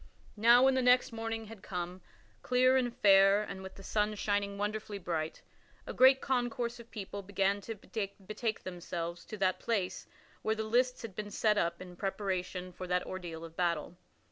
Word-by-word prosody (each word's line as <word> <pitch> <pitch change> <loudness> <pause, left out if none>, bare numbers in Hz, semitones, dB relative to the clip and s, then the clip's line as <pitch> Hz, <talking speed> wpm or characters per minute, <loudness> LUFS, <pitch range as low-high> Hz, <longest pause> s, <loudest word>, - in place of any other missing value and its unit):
Now 235 +3 +6
when 265 0 +5
the 260 - +2
next 250 0 +4
morning 225 0 -4
had 220 -2 -11
come 180 -1 -5 0.4
clear 255 +1 +4
and 250 -2 +2
fair 200 -3 +5
and 195 -2 -7
with 190 0 -9
the 195 - -12
sun 210 +1 0
shining 205 -1 -1
wonderfully 210 0 -3
bright 165 -4 -3 0.4
a - - -5
great 265 +1 +6
concourse 245 -2 -1
of 235 0 -12
people 200 -1 -6
began 200 +1 0
to 225 +2 -6
betake 215 +1 -4
themselves 175 -1 -5
to 215 - -7
that 190 -2 +1
place 205 -6 -2 0.3
where 220 - 0
the 220 - -2
lists 250 +3 +1
had 225 -4 -6
been 210 -1 -4
set 210 0 +2
up 170 0 0
in 180 -1 -10
preparation 185 -2 -3
for 185 +1 -7
that 180 0 0
ordeal 170 -3 -6
of 165 0 -12
battle. 170 -2 -1
205 Hz, 180 wpm, -32 LUFS, 185-225 Hz, 0.4 s, Now